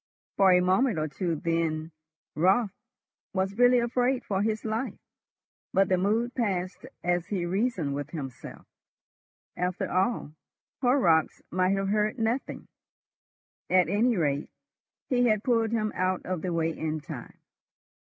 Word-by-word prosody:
For 195 -1 +5
a 180 0 +5
minute 190 +4 +2
or 155 0 0
two 165 +3 -2
then 165 0 -1 0.4
Raut 190 +6 +3 0.6
was 190 +3 -1
really 245 0 +6
afraid 245 +2 +1
for 195 -1 0
his 215 +1 -1
life, 220 +4 -2 0.8
but 195 -1 +3
the 185 - +3
mood 225 +6 +1
passed 185 -6 -2 0.2
as 175 -1 0
he 185 -4 -2
reasoned 185 - -1
with 145 +1 -4
himself. 135 -6 -8 0.9
After 180 0 -2
all, 185 -3 0 0.5
Horrocks 220 - +3
might 185 +2 +2
have 195 0 -1
heard 210 +3 +1
nothing. 230 +3 -2 1.0
At 180 -3 +4
any 225 +4 +2
rate, 145 -3 0 0.6
he 245 -2 +2
had 215 -2 +2
pulled 230 -3 +2
him 215 -2 0
out 185 0 -1
of 180 -3 -3
the 185 - -2
way 165 -1 0
in 155 0 -2
time. 145 - -9
190 Hz, 140 wpm, -28 LUFS, 170-225 Hz, 1.0 s, really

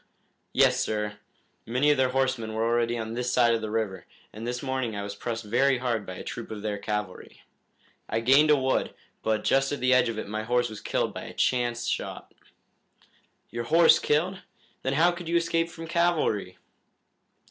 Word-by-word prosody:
"Yes, 130 -1 +4
sir. 105 -3 -2 0.5
Many 130 +6 +3
of 145 - +2
their 130 -1 +3
horsemen 130 -4 -1
were 110 +1 0
already 120 0 +1
on 110 0 -4
this 125 +1 -2
side 120 -2 +4
of 115 - 0
the 110 - -4
river, 110 -3 -3 0.3
and 110 +2 -7
this 125 +2 -3
morning 130 -4 -2
I 100 - -3
was 100 0 -5
pressed 115 +1 -4
very 130 +5 +2
hard 120 -4 -2
by 95 - -6
a - - -8
troop 120 - -6
of 105 -1 -7
their 105 -1 -2
cavalry. 105 -3 -5 0.7
I 115 - 0
gained 135 +6 +5
a 150 - +7
wood, 130 -1 0 0.3
but 110 -1 0
just 135 0 +2
at 145 - -2
the 130 +1 +3
edge 125 -2 +4
of 115 - -4
it 110 - -4
my 110 +1 -3
horse 120 +1 0
was 110 - -8
killed - - -1
by - - -7
a - - -10
chance 120 -1 0
shot." - - -4 1.2
"Your 120 0 -4
horse 165 +5 +6
killed? 180 +6 0 0.4
Then 130 - -1
how 165 +5 +4
could 175 -1 -7
you 170 - 0
escape 165 0 0
from 165 0 -9
cavalry?" 165 - 0
120 Hz, 195 wpm, -27 LUFS, 110-135 Hz, 1.2 s, a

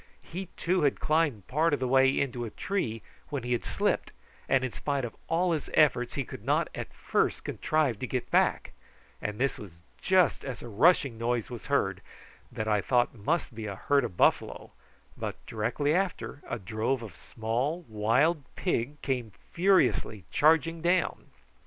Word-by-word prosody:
He 185 +3 -6
too 180 +1 +1
had 145 -2 +2
climbed 150 - +1
part 155 +3 +2
of - - -8
the 130 - -1
way 135 +1 +4
into 125 -3 -1
a 115 - -4
tree, 115 - -3 0.3
when 140 -5 -3
he 120 - -4
had 120 - +1
slipped, - - -1 0.4
and 135 -1 +3
in 130 - -2
spite 140 0 -2
of 115 - -7
all 175 +2 +2
his 155 -3 -2
efforts 125 -5 +3
he - - 0
could - - -10
not - - +1
at - - -6
first - - 0
contrive 150 -9 0
to 125 - -3
get 125 -1 -3
back; - - +2 0.5
and 105 0 -3
this 135 +3 0
was 100 -5 -9 0.3
just 185 -5 +3
as 135 -3 -6
a - - -7
rushing 120 - +3
noise 120 0 -1
was 120 -6 -7
heard, - - +1 0.5
that 110 - -4
I 105 -2 +2
thought 120 +3 +2
must 135 +6 -1
be 110 -1 -6
a 100 - -4
herd 140 +7 +2
of 105 -7 -5
buffalo, - - +1 0.4
but, - - -4
directly 145 +7 0
after, 180 -5 -2
a - - -2
drove 110 +5 -2
of 100 -6 -9
small 125 - -2
wild 120 +10 +2
pig 150 -4 -1
came 125 -6 -2 0.2
furiously 175 - +2
charging 160 +2 +3
down. 175 +2 +1
130 Hz, 175 wpm, -29 LUFS, 115-155 Hz, 0.5 s, way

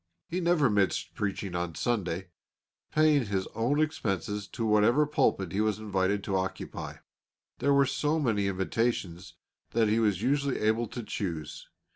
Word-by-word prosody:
He 175 - -2
never 170 -4 +3
missed 100 -4 +1
preaching 100 -2 -3
on 85 -2 -3
Sunday, 95 -6 -1 0.6
paying 150 -5 +3
his 95 -2 -1
own 120 +7 +1
expenses 105 - -1
to 115 - -4
whatever 110 +7 +4
pulpit 100 - +1
he 100 - 0
was 110 -2 +1
invited 100 -1 0
to 100 - -2
occupy. 95 0 -4 0.6
There 140 - +2
were 140 0 +5
so 150 +3 0
many 110 -8 +1
invitations 95 -2 -2 0.4
that 115 -2 +3
he 110 +2 +2
was 105 -3 +1
usually 140 +1 +1
able 110 +2 +1
to 120 +2 -6
choose. 85 -8 -5
105 Hz, 150 wpm, -29 LUFS, 95-130 Hz, 0.6 s, were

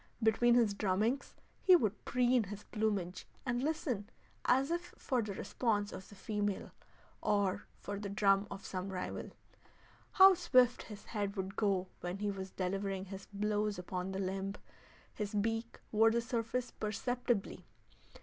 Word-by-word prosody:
Between 235 +2 +5
his 230 -4 +4
drummings 210 +7 0 0.3
he 370 - +8
would 220 - 0
preen 245 -2 +3
his 205 +2 -7
plumage 205 -5 -2 0.2
and 245 -1 0
listen 270 -9 -1 0.4
as 265 +4 +3
if 345 +1 -3
for 255 -4 0
the 205 -3 -4
response 205 -3 0
of 190 - -8
the 205 - -12
female, 205 0 -2 0.5
or 200 -1 +1
for 200 0 -5
the 205 -1 -4
drum 200 0 +3
of 195 0 -8
some 185 +1 -4
rival. 185 -1 -4 0.8
How 385 0 +9
swift 255 -9 +4
his 210 -2 -10
head 205 -2 -2
would 190 0 -3
go 195 -4 +1
when 175 +2 -4
he 205 0 -1
was 190 -1 -5
delivering 195 +1 -2
his 195 0 -8
blows 210 0 0
upon 180 +1 -4
the 190 - -3
limb! 195 +1 -2 0.6
His 210 0 -4
beak 225 +2 -1
wore 225 +1 +6
the 230 +1 +2
surface 235 +1 -2
perceptibly. 240 0 -2
210 Hz, 150 wpm, -34 LUFS, 195-235 Hz, 0.8 s, How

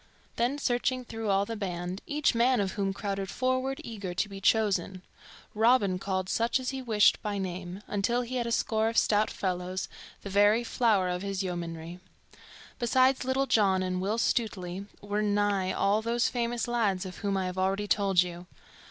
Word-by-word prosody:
Then 245 +5 0
searching 255 -1 0
through 225 -2 -4
all 195 0 +3
the 230 - -5
band, 180 -2 -4
each 300 0 +1
man 245 +1 +3
of 195 -2 0
whom 195 -1 -1
crowded 195 -1 -3
forward 255 +4 -1
eager 200 -6 -6
to 200 - 0
be 195 -1 -9
chosen, 190 -3 +1 0.5
Robin 215 -4 +3
called 185 -1 -2
such 230 +6 +1
as 255 +1 -3
he 265 -1 -5
wished 220 -4 +3
by 210 -2 -3
name, 185 0 -5
until 235 +5 0
he 255 +2 -4
had 240 -1 -1
a - - -2
score 220 -1 +1
of 230 - -4
stout 210 0 +3
fellows, 185 0 -3 0.4
the 200 - -6
very 205 +4 +4
flower 220 -6 +2
of 180 0 -2
his 195 -1 -2
yeomanrie. 170 -1 -5 0.8
Besides 260 +2 +3
Little 265 +1 +1
John 195 -7 +3
and 185 0 -2
Will 205 +4 -1
Stutely 200 -5 -1
were 205 +1 -2
nigh 205 -2 +1
all 200 +3 +2
those 235 +1 +1
famous 240 -1 -2
lads 210 -6 0
of 185 - -8
whom 200 -2 -1
I 190 - -1
have 185 0 -4
already 195 +2 0
told 195 -3 +3
you. 175 0 -8
205 Hz, 180 wpm, -29 LUFS, 190-235 Hz, 0.8 s, very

